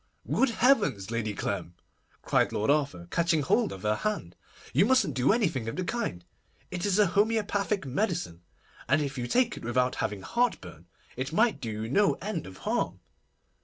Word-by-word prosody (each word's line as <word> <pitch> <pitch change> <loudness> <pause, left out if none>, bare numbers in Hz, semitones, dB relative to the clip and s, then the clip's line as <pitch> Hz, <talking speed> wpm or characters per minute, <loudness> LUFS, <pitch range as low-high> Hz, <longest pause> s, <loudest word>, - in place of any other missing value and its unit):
'Good 270 - +2
heavens! 205 - +2
Lady 110 -3 -2
Clem,' 90 -4 -3 0.5
cried - - +2
Lord 110 +6 +1
Arthur, 140 - 0
catching 170 -3 +2
hold 220 +9 +2
of 95 - -8
her 105 0 +1
hand, 210 - -3 0.4
'you - - +5
mustn't 255 - +3
do 130 +1 +3
anything 170 - 0
of - - -5
the 185 - -2
kind. 175 - -3 0.5
It 180 +2 -2
is 195 -1 +2
a 210 - +6
homoeopathic 205 0 +1
medicine, 135 - -2 0.5
and - - +4
if 135 -2 -4
you 120 - -2
take 245 - +2
it - - -9
without 125 +2 0
having 100 -2 -3
heartburn, 90 - -2 0.3
it 130 +3 -3
might 225 +7 +2
do 115 - -4
you - - -3
no 200 - +3
end 190 - -4
of 95 0 -11
harm. - - -1
150 Hz, 175 wpm, -28 LUFS, -, 0.5 s, a